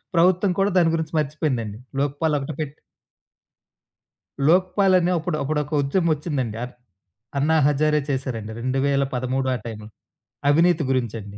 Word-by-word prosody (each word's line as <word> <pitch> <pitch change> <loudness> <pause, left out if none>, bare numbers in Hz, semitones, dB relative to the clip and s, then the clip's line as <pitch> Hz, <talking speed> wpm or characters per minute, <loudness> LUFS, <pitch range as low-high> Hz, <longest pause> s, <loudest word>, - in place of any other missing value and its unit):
ప్రభుత్వం 185 +3 +4
కూడా 195 +1 +2
దాని 165 -1 +3
గురించి 160 -1 -3
మర్చిపోయిందండి. 140 -8 -2 0.2
లోక్పాల్ 145 +2 0
ఒకటి 140 +3 -5
పెట్ 150 -1 -5 1.7
లోక్పాల్ 185 +3 +4
అనే 175 +1 +1
అప్పుడు 155 -1 -2
అప్పుడొక 150 +1 -2
ఉద్యమం 165 +5 +1
ఒచ్చిందండి. 135 -8 -3
ఆర్ 125 - -7 0.6
అన్నా 155 +3 +2
హజారే 150 +1 +2
చేసారండి. 130 -5 -3
2013 130 0 0
ఆ - - -2
టైమ్‌లో 110 -2 -7 0.6
అవినీతి 165 +2 +4
గురించండి. 110 -5 -3
145 Hz, 120 wpm, -23 LUFS, 130-165 Hz, 1.7 s, ప్రభుత్వం